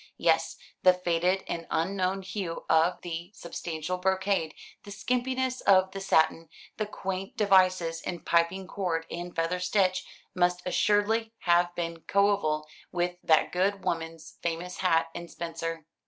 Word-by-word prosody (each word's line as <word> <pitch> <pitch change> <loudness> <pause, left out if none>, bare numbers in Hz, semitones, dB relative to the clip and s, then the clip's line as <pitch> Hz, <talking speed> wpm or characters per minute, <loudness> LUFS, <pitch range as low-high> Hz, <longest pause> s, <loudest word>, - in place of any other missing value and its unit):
Yes, 165 -1 +2 0.2
the 185 -1 +6
faded 180 +1 +1
and 165 -1 -4
unknown 190 +2 0
hue 185 -3 -4
of 165 +2 +3
the 170 0 -5
substantial 170 +1 -4
brocade, 190 -3 0 0.3
the - - -12
skimpiness 255 +5 -1
of 190 -1 +4
the 195 0 -6
satin, 165 -3 +2 0.3
the 215 - -1
quaint 195 +4 -5
devices 185 -5 +3
in 175 - -5
piping 170 +3 +1
cord 175 -4 -2
and 175 +1 -6
feather 165 +2 0
stitch 185 0 +1 0.3
must 180 0 +1
assuredly 210 +4 +2
have 175 0 +3
been 165 -1 -3
coeval 195 -6 +2 0.3
with 175 0 -1
that 155 -1 +4
good 195 +2 0
woman's 165 -1 -4
famous 170 +2 -3
hat 165 -3 +2
and 170 0 -7
spencer. 165 -1 -5
180 Hz, 140 wpm, -28 LUFS, 165-195 Hz, 0.3 s, the